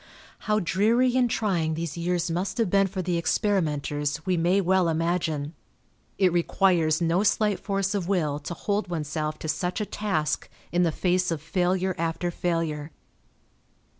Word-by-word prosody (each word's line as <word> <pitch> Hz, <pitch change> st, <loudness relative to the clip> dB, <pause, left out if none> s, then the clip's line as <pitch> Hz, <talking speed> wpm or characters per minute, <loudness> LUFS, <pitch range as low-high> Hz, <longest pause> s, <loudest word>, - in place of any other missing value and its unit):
How 210 Hz, 0 st, +3 dB
dreary 225 Hz, +7 st, +2 dB
and 250 Hz, -2 st, +3 dB
trying 175 Hz, -9 st, 0 dB
these 165 Hz, -2 st, -4 dB
years 175 Hz, 0 st, -1 dB
must 185 Hz, +3 st, -2 dB
have 225 Hz, -6 st, +1 dB
been 195 Hz, 0 st, +4 dB
for 190 Hz, -1 st, -4 dB
the 175 Hz, -1 st, 0 dB
experimenters 150 Hz, -5 st, 0 dB
we 185 Hz, -1 st, +1 dB
may 175 Hz, +3 st, +2 dB
well 185 Hz, -2 st, +2 dB
imagine. 165 Hz, -2 st, -1 dB, 0.6 s
It 185 Hz, -3 st, +3 dB
requires 170 Hz, -2 st, +2 dB
no 170 Hz, +2 st, +2 dB
slight 210 Hz, -1 st, +2 dB
force 195 Hz, -1 st, -1 dB
of 195 Hz, -4 st, -2 dB
will 155 Hz, -7 st, 0 dB
to 160 Hz, +4 st, -6 dB
hold 205 Hz, +2 st, -1 dB
oneself 155 Hz, -2 st, -3 dB
to -, -, -6 dB
such 180 Hz, +5 st, -1 dB
a 210 Hz, -, -1 dB
task 175 Hz, -9 st, -2 dB, 0.2 s
in 175 Hz, -, +2 dB
the 170 Hz, -2 st, +3 dB
face 180 Hz, +2 st, +1 dB
of 165 Hz, -2 st, -1 dB
failure 185 Hz, +3 st, 0 dB
after 165 Hz, +1 st, -1 dB
failure. 165 Hz, -4 st, -2 dB
175 Hz, 160 wpm, -26 LUFS, 160-195 Hz, 0.6 s, been